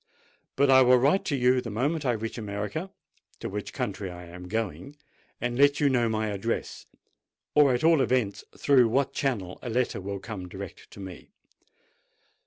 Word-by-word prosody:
But 140 0 +4
I 130 0 +8
will 125 0 +6
write 140 +10 +3
to 145 - 0
you 125 0 +3
the 120 - -6
moment 140 +7 -1
I 120 - +3
reach 115 +1 -4
America—to 105 - -7
which 105 +1 -5
country 100 -1 -3
I 90 0 -9
am 90 +1 -10
going—and 120 - -5
let 145 0 +5
you 145 - +4
know 120 -3 +2
my 110 -1 -1
address, 105 +3 -3 0.7
or 145 -2 +6
at 125 - -3
all 165 -3 +5
events 120 -5 0
through 130 -4 +5
what 135 +4 +1
channel 105 -10 -2
a 125 - -5
letter 120 -3 0
will 100 +1 -4
come 95 -2 -7
direct 95 0 -9
to - - -13
me. 95 -3 -9
120 Hz, 170 wpm, -27 LUFS, 100-135 Hz, 0.7 s, I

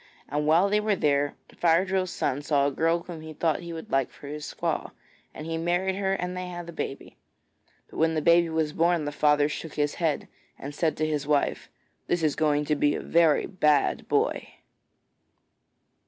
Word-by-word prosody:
And 150 +1 -2
while 170 +5 +5
they 210 +1 +2
were 210 -1 +1
there 145 -4 +1 0.2
Fire 170 +2 +3
drill's 185 -1 -1
son 135 -3 -2
saw 145 -1 +2
a 140 - +1
girl 165 +4 +1
whom 170 -3 -8
he 160 0 -9
thought 160 +1 0
he 170 -1 -8
would 165 -1 -8
like 135 -2 +1
for - - -15
his 150 +1 -6
squaw, - - -3 0.4
and 155 - -9
he 165 0 -3
married 175 +3 0
her 195 -1 0
and 180 -1 -3
they 180 0 -4
had 175 -1 -7
a - - -6
baby. 135 - -6 0.7
But - - -12
when 160 0 +2
the 155 - 0
baby 170 0 +5
was 160 -2 -1
born 170 -1 +2
the 145 - -2
father 150 0 +3
shook 155 +1 -6
his 145 -1 0
head 160 -3 0 0.3
and 140 +2 -7
said 160 +1 0
to 155 - 0
his 150 -2 -2
wife: 145 -2 0 0.4
'This 175 -2 0
is 150 -3 +2
going 150 -2 +1
to 150 - +1
be 145 0 +2
a - - -3
very 165 -3 +3
bad 150 -6 +1
boy.' - - +1
160 Hz, 200 wpm, -26 LUFS, 150-175 Hz, 0.7 s, while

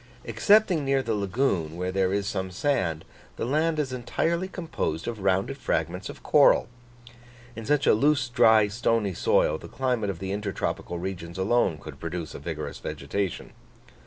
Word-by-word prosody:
Excepting 200 -7 +3
near 135 -1 +1
the 115 - -1
lagoon, 100 - -1
where 90 +1 -2
there 95 -1 +1
is 100 0 0
some 95 -3 -2
sand, 90 - -1 0.3
the - - -3
land 155 +5 +1
is 140 -4 -1
entirely 165 +8 -1
composed 165 - -4
of 115 -2 -4
rounded 95 0 0
fragments - - -2
of - - -10
coral. - - +5 0.9
In 115 -1 -7
such 145 0 +2
a - - +6
loose, 140 +3 +2
dry, 110 -3 +5
stony 110 -2 0
soil, 80 -2 +2
the - - -10
climate 125 -6 -1
of 95 - -3
the 95 +2 -5
intertropical 100 -3 -3
regions 85 -1 -6
alone 95 -3 +2
could - - -11
produce 85 -1 -5
a - - -7
vigorous - - -5
vegetation. 100 -3 -4
105 Hz, 160 wpm, -26 LUFS, 95-135 Hz, 0.9 s, a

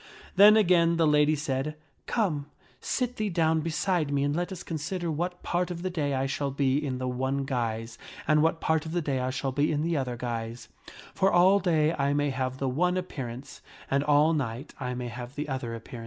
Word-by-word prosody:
Then 210 +2 +8
again 170 -4 +4
the 165 - +3
lady 150 0 +4
said, 145 0 -2 0.3
Come, 160 -11 0 0.3
sit 250 -1 -2
thee 215 -1 -1
down 160 -2 +2
beside 165 -1 0
me 140 -1 +1
and 175 +5 -2
consider 165 +2 -3
what 175 +3 -3
part 180 +1 0
of 175 -1 -5
the 185 - -2
day 145 -5 -1
I 130 0 0
shall 140 +1 -2
be 140 +1 +1
in 130 -3 -2
the 130 0 -3
one 130 +2 -1
guise, 115 -3 -3 0.3
and 150 -1 +4
what 165 +1 +2
part 160 0 +1
the 165 +3 -2
day 140 -3 -1
I 130 0 -1
shall 135 +1 -2
be 145 +3 +1
in 150 0 0
the 170 0 0
other 125 -3 -2
guise; 115 -1 -5 0.4
for 195 0 +2
all 185 +3 +5
day 160 -4 +2
I 140 -1 0
may 145 0 +1
^ - - -3
have 130 0 -2
the 135 - -2
one 180 +8 +1
appearance, 135 -8 -6 0.3
and 140 +1 +2
all 150 +2 +4
night 130 -4 -3
I 125 -2 -3
may 125 -1 -4
have 120 +2 -8
the 150 +1 -3
other 130 -4 -3
appearance. 115 +1 -9
145 Hz, 210 wpm, -28 LUFS, 130-170 Hz, 0.4 s, Then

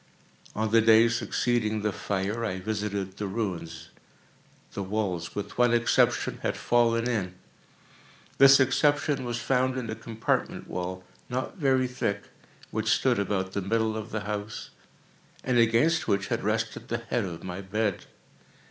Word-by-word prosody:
On 110 0 -1
the 115 0 +6
day 110 +1 +6
succeeding 115 -2 0
the 105 - +1
fire, 100 +5 -2
I 95 -4 -2
visited 100 -1 -3
the 105 - -3
ruins. 90 -6 -4 0.8
The 100 - -4
walls, 95 -4 -2
with 105 +3 -5
one 120 -1 +5
exception, 120 0 +2
had - - -1
fallen 115 -1 +2
in. 100 -7 -2 1.0
This 135 0 +8
exception 145 0 +2
was 120 -1 -2
found 130 +2 +1
in 115 -3 -3
a - - -3
compartment 115 -2 -2
wall, 90 +1 -4 0.3
not 130 +9 -3
very 130 -3 +3
thick, 100 -5 -2 0.5
which - - -1
stood - - +3
about 95 -1 -1
the 100 - -1
middle 110 +3 0
of 110 +1 -5
the 110 -2 -3
house, 105 +1 -5 0.7
and 125 -2 +2
against 120 +10 +3
which 100 -1 0
had - - -1
rested 110 +1 -2
the 120 - -1
head 115 0 -2
of 85 -3 -7
my 95 +1 -5
bed. 100 0 -2
110 Hz, 150 wpm, -27 LUFS, 100-120 Hz, 1.0 s, This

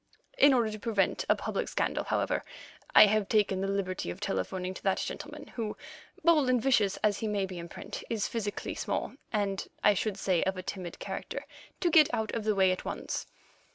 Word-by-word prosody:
In 290 - +7
order 230 -3 +2
to 215 - -6
prevent 205 -2 0
a - - +6
public - - -3
scandal, - - -1
however, - - 0 0.5
I - - +11
have 210 -1 +1
taken 205 -3 +2
the 195 - 0
liberty 190 - -2
of 90 - -6
telephoning 180 - -2
to - - -9
that 195 -1 +1
gentleman, - - -6
who, 220 -3 -4 0.5
bold 310 -5 +5
and 250 -1 +4
vicious 220 -6 +2
as 210 -1 +2
he 220 - -2
may 205 -2 0
be 185 -2 -7
in 170 0 -7
print, - - -7
is 225 -3 0
physically 210 -3 -3
small - - -2 0.2
and, 200 -3 -1 0.2
I 210 - +6
should 200 0 -1
say, 185 -3 +1
of 190 0 0
a 185 - -5
timid 180 -2 -6
character, - - -5 0.4
to 345 - +2
get 310 -3 +6
out 220 -1 -2
of 225 -2 -3
the 215 -1 +2
way 190 -1 +4
at 185 - -3
once. - - -4
205 Hz, 205 wpm, -30 LUFS, 190-220 Hz, 0.5 s, I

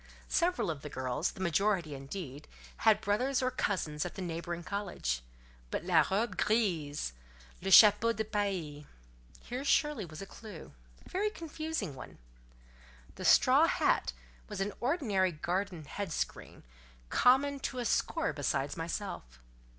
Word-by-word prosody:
Several 345 - +1
of 145 -3 -7
the 150 - -7
girls, 130 +4 -2
the - - -13
majority, 180 -2 +1
indeed, 140 +1 -7 0.3
had 220 -2 +4
brothers 255 +6 +1
or 255 - +1
cousins 155 -10 -1
at 175 - -6
the - - -5
neighbouring 170 0 -4
college. 180 - -2 0.5
But - - -3
"la 170 -3 +5
robe 200 +1 0
grise, 165 - 0 0.5
le 190 - -2
chapeau 210 +3 +8
de 220 -1 -2
paille," 190 -9 -2 0.6
here 250 +3 -5
surely 295 -4 +2
was 155 -3 -9
a 195 - -6
clue—a 70 - -13
very 405 +3 0
confusing 315 - -4
one. 130 - -10 1.0
The - - -7
straw - - +6
hat - - +2 0.4
was - - -5
an 195 +1 -1
ordinary 230 - +1
garden 175 +1 -2
head 195 +5 -5
screen, - - -4 0.5
common 280 +3 +4
to 260 - -4
a 245 - -2
score 185 - 0
besides 145 -1 -1
myself. 165 - -5
190 Hz, 140 wpm, -32 LUFS, 155-225 Hz, 1.0 s, chapeau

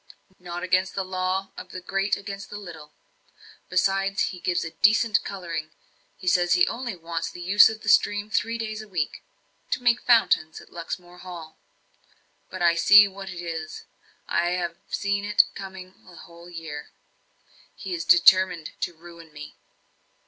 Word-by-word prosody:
"Not 175 0 -6
against 185 +1 +1
the 195 - -1
law 185 +1 -2
of - - -9
the 185 - -7
great 195 +2 -1
against 200 0 -8
the 205 - -7
little. 165 -7 -11 0.8
Besides, 195 +2 +1
he 180 - -9
gives 175 -1 -1
a 165 - -6
decent 215 +3 +3
colouring 170 -5 -5 0.6
says 175 -1 +3
he 175 - +4
only 240 -4 -4
wants 165 -1 -4
the - - -11
use 195 +4 +6
of 220 -1 -7
the - - -10
stream 205 0 +3
three 230 +1 0
days 220 -1 -4
a 215 - -12
week, 175 -7 -3 0.5
to 250 - -2
make 240 0 +3
fountains 220 -9 +3
at - - -17
Luxmore 175 +1 -7
Hall. 175 -4 -10 0.9
But 185 -1 -5
I 170 -1 +5
see 205 +4 +7
what 195 0 -9
it 175 -1 -7
is 160 -2 -6 0.4
I 175 - +1
have 175 -2 -2
seen 200 0 -1
it 210 0 +5
coming 190 -1 -9
a 180 - -14
whole 170 +1 -14
year. 160 -4 -8 0.9
He 190 - -6
is 165 -1 -3
determined 180 -1 +5
to 175 - -3
ruin 170 0 -14
me!" 150 0 -10
185 Hz, 165 wpm, -25 LUFS, 170-200 Hz, 0.9 s, see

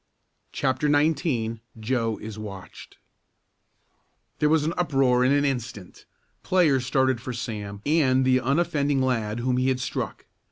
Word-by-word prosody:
CHAPTER 135 +2 0
XIX 140 -7 +1 0.2
JOE 115 -1 -1
IS 110 0 -8
WATCHED 100 -3 -10 1.4
There 150 - +3
was 155 -1 +3
an 165 - -1
uproar 135 -7 +2
in 130 - +3
an 145 0 +3
instant. 120 -8 -5 0.4
Players 145 -9 +2
started 130 -3 +1
for 125 0 -5
Sam 105 -4 -6
and 130 -4 +3
the 130 0 +4
unoffending 140 0 +1
lad 115 -3 -1
whom 125 0 0
he 130 +1 +1
had 130 -1 0
struck. - - -4
130 Hz, 135 wpm, -25 LUFS, 115-145 Hz, 1.4 s, the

